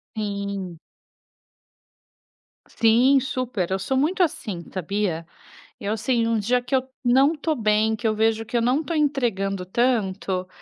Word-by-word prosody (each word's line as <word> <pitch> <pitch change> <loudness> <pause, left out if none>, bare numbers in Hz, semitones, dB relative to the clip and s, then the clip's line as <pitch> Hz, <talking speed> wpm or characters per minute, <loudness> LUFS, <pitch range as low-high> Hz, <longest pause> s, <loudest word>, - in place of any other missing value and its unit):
Sim. 200 -4 -4 1.9
Sim, 245 +5 +4
super, 250 -9 -3
eu 190 - 0
sou 260 +7 -1
muito 340 +7 +1
assim 260 - -1
sabia? 185 -2 -2 0.5
Eu 210 +2 -2
sei 230 0 +1
o 230 -1 +1
dia 245 +4 +1
que 250 +2 -1
eu 260 0 0 0.2
não 265 +5 +4
estou 310 0 -2
bem, 215 -1 +2
que 230 0 -2
eu 215 - +2
vejo 225 +1 +1
que 235 - -7
eu - - +2
não 255 +6 +2
estou 330 +1 -4
entregando 225 -11 0
tanto, 190 -4 0
225 Hz, 145 wpm, -23 LUFS, 200-260 Hz, 1.9 s, Sim